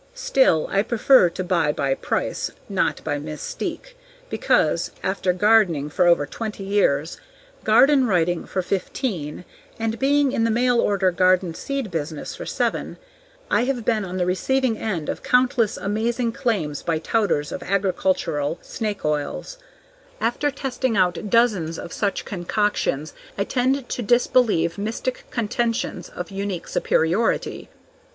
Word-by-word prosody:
Still, 265 Hz, -, +3 dB
I 195 Hz, -, +3 dB
prefer 235 Hz, -2 st, +4 dB
to 180 Hz, +2 st, -5 dB
buy 170 Hz, -5 st, +1 dB
by 140 Hz, -2 st, 0 dB
price, -, -, -2 dB, 0.2 s
not -, -, -1 dB
by 145 Hz, -2 st, -2 dB
mystique, 155 Hz, -, -6 dB, 0.4 s
because, -, -, +2 dB
after 190 Hz, -1 st, 0 dB
gardening 180 Hz, -7 st, +3 dB
for 180 Hz, +3 st, +3 dB
over 170 Hz, -4 st, +4 dB
twenty 210 Hz, +6 st, -6 dB
years, 175 Hz, -6 st, +1 dB, 0.4 s
garden 275 Hz, -2 st, +5 dB
writing 175 Hz, -3 st, +1 dB
for 185 Hz, -, -2 dB
fifteen 180 Hz, -, -3 dB, 0.3 s
and 225 Hz, 0 st, -2 dB
being 280 Hz, 0 st, +3 dB
in 225 Hz, -, 0 dB
the 230 Hz, -, +2 dB
mail 240 Hz, +1 st, +2 dB
order 195 Hz, -2 st, +2 dB
garden 185 Hz, -1 st, +2 dB
seed 270 Hz, +2 st, -4 dB
business 155 Hz, -2 st, -4 dB
for -, -, -7 dB
seven -, -, -2 dB, 0.5 s
I 240 Hz, -, +3 dB
have 250 Hz, -4 st, -2 dB
been 220 Hz, -3 st, +1 dB
on 185 Hz, -1 st, -5 dB
the 180 Hz, -, +1 dB
receiving 250 Hz, +7 st, +1 dB
end 185 Hz, -8 st, -3 dB
of -, -, -3 dB
countless 250 Hz, -3 st, +2 dB
amazing 230 Hz, +4 st, -1 dB
claims 180 Hz, -, -1 dB
by 165 Hz, -2 st, 0 dB
touters 165 Hz, -4 st, 0 dB
of -, -, -5 dB
agricultural 185 Hz, -5 st, 0 dB
snake 210 Hz, -5 st, -4 dB
oils; 150 Hz, -, -2 dB, 0.6 s
after 245 Hz, +5 st, 0 dB
testing 260 Hz, -4 st, -2 dB
out 185 Hz, +2 st, +1 dB
dozens 195 Hz, -8 st, +2 dB
of 170 Hz, -, -7 dB
such 200 Hz, -2 st, -1 dB
concoctions 180 Hz, -5 st, -1 dB, 0.2 s
I 200 Hz, -, +1 dB
tend 260 Hz, +3 st, 0 dB
to -, -, -3 dB
disbelieve 225 Hz, -7 st, +2 dB
mystic 225 Hz, +4 st, -3 dB
contentions 230 Hz, -5 st, -2 dB
of 180 Hz, +2 st, -7 dB
unique 195 Hz, -3 st, -4 dB
superiority. 175 Hz, +8 st, 0 dB
200 Hz, 140 wpm, -23 LUFS, 170-235 Hz, 0.6 s, garden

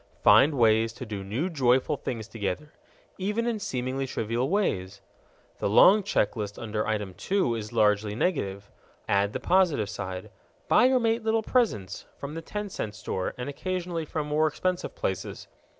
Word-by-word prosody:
Find 145 Hz, +2 st, +6 dB
ways 115 Hz, -1 st, +4 dB
to 125 Hz, +2 st, -7 dB
do 105 Hz, -3 st, -5 dB
new 115 Hz, -, -2 dB
joyful 130 Hz, -6 st, +2 dB
things 110 Hz, -3 st, -5 dB
together_, 110 Hz, +6 st, -4 dB, 0.5 s
even 210 Hz, +5 st, -1 dB
in 235 Hz, -2 st, -1 dB
seemingly 135 Hz, -, -2 dB
trivial 120 Hz, +2 st, -1 dB
ways. 100 Hz, -, -1 dB, 0.6 s
The -, -, 0 dB
long 195 Hz, -, +7 dB
check 185 Hz, -, 0 dB
list 105 Hz, -2 st, -4 dB
under 110 Hz, -2 st, -3 dB
item 105 Hz, -3 st, -2 dB
2 185 Hz, -, 0 dB
is 110 Hz, -2 st, -5 dB
largely 105 Hz, -2 st, +2 dB
negative. 100 Hz, -, -2 dB, 0.4 s
Add 100 Hz, +1 st, +2 dB
the 130 Hz, -, -3 dB
positive 155 Hz, -, +2 dB
side. 95 Hz, -3 st, -6 dB, 0.4 s
Buy 245 Hz, -, +5 dB
your 260 Hz, 0 st, +4 dB
mate 230 Hz, 0 st, +1 dB
little 220 Hz, 0 st, +1 dB
presents 215 Hz, -, 0 dB
from 140 Hz, +1 st, -6 dB
the 165 Hz, -, -5 dB
ten 210 Hz, +5 st, -5 dB
cent 105 Hz, -, -5 dB
store 95 Hz, -1 st, -3 dB
and 125 Hz, -, -4 dB
occasionally 175 Hz, +2 st, -3 dB
from 150 Hz, 0 st, -3 dB
more 150 Hz, +1 st, +2 dB
expensive 180 Hz, +4 st, -2 dB
places. 95 Hz, -2 st, -4 dB
125 Hz, 165 wpm, -27 LUFS, -, 0.6 s, long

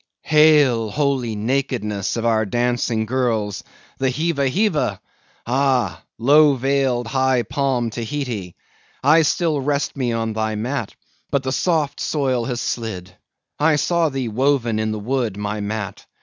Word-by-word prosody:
Hail, 150 Hz, -7 st, +4 dB
holy 130 Hz, -3 st, 0 dB
nakedness 110 Hz, -3 st, -1 dB
of 115 Hz, -, -2 dB
our 110 Hz, -1 st, +3 dB
dancing 120 Hz, 0 st, 0 dB
girls!—the 115 Hz, +1 st, -2 dB
Heeva 140 Hz, 0 st, 0 dB
Heeva! 185 Hz, +1 st, 0 dB, 0.5 s
Ah! 130 Hz, 0 st, +1 dB, 0.2 s
low 145 Hz, +4 st, +5 dB
veiled, 135 Hz, -2 st, 0 dB
high 130 Hz, 0 st, +1 dB
palmed 130 Hz, -4 st, -1 dB
Tahiti! 120 Hz, -7 st, -4 dB, 0.5 s
I 155 Hz, +4 st, +6 dB
still 160 Hz, -1 st, +1 dB
rest 140 Hz, +1 st, -1 dB
me 125 Hz, -4 st, -1 dB
on 115 Hz, -1 st, -2 dB
thy 110 Hz, 0 st, -1 dB
mat, 115 Hz, +1 st, -3 dB, 0.3 s
but 140 Hz, -1 st, 0 dB
the 130 Hz, -, -2 dB
soft 150 Hz, +1 st, 0 dB
soil 130 Hz, -5 st, 0 dB
has 125 Hz, -2 st, -3 dB
slid! 95 Hz, -6 st, -4 dB, 0.4 s
I 155 Hz, +1 st, +4 dB
saw 170 Hz, +2 st, +1 dB
thee 135 Hz, -3 st, -3 dB
woven 120 Hz, -1 st, +1 dB
in 110 Hz, 0 st, -1 dB
the 110 Hz, -, -3 dB
wood, 115 Hz, -1 st, -2 dB
my 105 Hz, +1 st, -3 dB
mat! 105 Hz, -1 st, -5 dB
125 Hz, 135 wpm, -21 LUFS, 110-140 Hz, 0.5 s, I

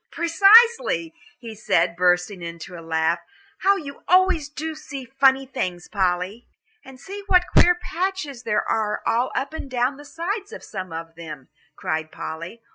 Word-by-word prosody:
"Precisely," 395 Hz, +1 st, +5 dB, 0.2 s
he 230 Hz, -3 st, -9 dB
said, 175 Hz, -5 st, +1 dB
bursting 180 Hz, +1 st, +1 dB
into 170 Hz, +2 st, -8 dB
a 170 Hz, -, -8 dB
laugh. 165 Hz, +1 st, 0 dB, 0.4 s
"How 395 Hz, +1 st, +4 dB
you 285 Hz, -7 st, -8 dB
always 365 Hz, -5 st, +3 dB
do 315 Hz, +2 st, -5 dB
see 280 Hz, -3 st, -8 dB
funny 270 Hz, +1 st, +3 dB
things, 185 Hz, -10 st, -4 dB
Polly." 190 Hz, +3 st, -1 dB, 0.4 s
"And 265 Hz, -2 st, -13 dB
see 395 Hz, +7 st, -8 dB
what 360 Hz, -2 st, +4 dB
queer 355 Hz, 0 st, +7 dB
patches 350 Hz, -7 st, -4 dB
there 210 Hz, -3 st, -1 dB
are 210 Hz, -1 st, -1 dB
all 245 Hz, +3 st, +1 dB
up 275 Hz, +4 st, -2 dB
and 300 Hz, -3 st, -6 dB
down 255 Hz, +2 st, 0 dB
the 290 Hz, -, -12 dB
sides 390 Hz, +7 st, -4 dB
of 475 Hz, -, -9 dB
some 185 Hz, -4 st, -7 dB
of 165 Hz, 0 st, -7 dB
them," 155 Hz, -5 st, -10 dB, 0.3 s
cried 155 Hz, 0 st, -3 dB
Polly. 170 Hz, +9 st, -7 dB
255 Hz, 160 wpm, -23 LUFS, -, 0.4 s, queer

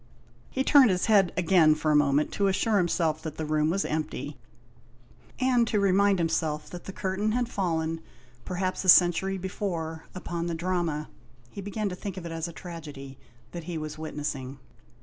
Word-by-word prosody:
He 265 Hz, -, -1 dB
turned 270 Hz, -3 st, +6 dB
his 180 Hz, -1 st, +1 dB
head 200 Hz, -5 st, +4 dB
again 170 Hz, -3 st, +5 dB
for 155 Hz, 0 st, 0 dB
a -, -, +4 dB
moment 145 Hz, 0 st, +3 dB
to 200 Hz, -, +1 dB
assure 210 Hz, +3 st, +2 dB
himself 165 Hz, -3 st, 0 dB
that 155 Hz, -2 st, -6 dB
the 160 Hz, -, -3 dB
room 155 Hz, 0 st, +1 dB
was 195 Hz, +4 st, 0 dB
empty, 150 Hz, -2 st, -3 dB, 1.0 s
and 250 Hz, -3 st, +3 dB
to 210 Hz, -, +1 dB
remind 200 Hz, 0 st, +3 dB
himself 160 Hz, -3 st, -1 dB
that 175 Hz, -1 st, -8 dB
the -, -, -5 dB
curtain 195 Hz, +3 st, -1 dB
had 245 Hz, 0 st, 0 dB
fallen, 165 Hz, -6 st, -1 dB, 0.4 s
perhaps 185 Hz, +1 st, -2 dB
a 185 Hz, -, +1 dB
century 180 Hz, +2 st, +5 dB
before, 170 Hz, -4 st, -4 dB
upon 175 Hz, -2 st, -4 dB
the 170 Hz, -, -2 dB
drama 170 Hz, -3 st, -1 dB, 0.2 s
— 120 Hz, 0 st, -29 dB
he 200 Hz, -, -7 dB
began 205 Hz, +2 st, -3 dB
to 180 Hz, -, -5 dB
think 190 Hz, 0 st, -6 dB
of 180 Hz, -, -6 dB
it 170 Hz, -, -5 dB
as 165 Hz, 0 st, -3 dB
a -, -, -7 dB
tragedy 150 Hz, -6 st, -9 dB, 0.2 s
— 120 Hz, -, -30 dB
that 170 Hz, -2 st, -7 dB
he 175 Hz, -1 st, -4 dB
was 155 Hz, 0 st, -6 dB
witnessing. 145 Hz, -4 st, -4 dB
170 Hz, 190 wpm, -27 LUFS, 155-190 Hz, 1.0 s, turned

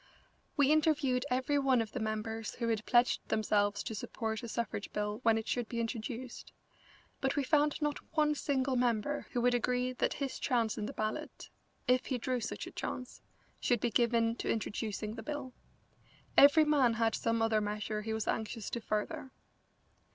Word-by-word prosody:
We 285 Hz, 0 st, +5 dB
interviewed 295 Hz, -4 st, +2 dB
every 260 Hz, +3 st, +1 dB
one 265 Hz, -3 st, +3 dB
of 225 Hz, -2 st, -2 dB
the 255 Hz, -, -4 dB
members 220 Hz, 0 st, -3 dB
who 235 Hz, -2 st, -1 dB
had 220 Hz, -1 st, -1 dB
pledged 240 Hz, 0 st, +3 dB
themselves 205 Hz, -2 st, +1 dB
to -, -, -4 dB
support 220 Hz, +1 st, -3 dB
a 235 Hz, -, -6 dB
suffrage 230 Hz, -2 st, -3 dB
bill 210 Hz, +1 st, -2 dB
when 225 Hz, -2 st, +4 dB
it 220 Hz, -, -4 dB
should 245 Hz, -3 st, -1 dB
be 235 Hz, -, -3 dB
introduced, 235 Hz, +2 st, -5 dB, 0.7 s
but 270 Hz, 0 st, 0 dB
we 285 Hz, -, +1 dB
found 295 Hz, +1 st, +2 dB
not 295 Hz, -1 st, 0 dB, 0.2 s
one 300 Hz, -1 st, +4 dB
single 270 Hz, -2 st, 0 dB
member 245 Hz, +3 st, 0 dB
who 245 Hz, -, -1 dB
would 245 Hz, +1 st, +3 dB
agree 250 Hz, +1 st, +1 dB
that -, -, 0 dB
his 275 Hz, -2 st, -3 dB
chance 235 Hz, -4 st, +1 dB
in 210 Hz, -, -3 dB
the -, -, -6 dB
ballot, 215 Hz, 0 st, -4 dB, 0.4 s
if 250 Hz, +1 st, +3 dB
he 260 Hz, -, 0 dB
drew 250 Hz, +1 st, -1 dB
such 230 Hz, -, -4 dB
a -, -, -8 dB
chance, 250 Hz, -1 st, -5 dB, 0.4 s
should 245 Hz, -3 st, +2 dB
be 235 Hz, +2 st, 0 dB
given 230 Hz, 0 st, +2 dB
to -, -, -3 dB
introducing 215 Hz, -1 st, -2 dB
the 225 Hz, -, -7 dB
bill. 275 Hz, 0 st, -5 dB, 0.8 s
Every 295 Hz, +3 st, +8 dB
man 275 Hz, -6 st, +3 dB
had 225 Hz, -1 st, +2 dB
some 230 Hz, 0 st, 0 dB
other 220 Hz, -1 st, +2 dB
measure 210 Hz, +1 st, -2 dB
he 220 Hz, +1 st, -4 dB
was 220 Hz, -1 st, -2 dB
anxious 220 Hz, -1 st, -2 dB
to 235 Hz, -, -3 dB
further. 240 Hz, +7 st, -2 dB
235 Hz, 180 wpm, -33 LUFS, 220-260 Hz, 0.8 s, Every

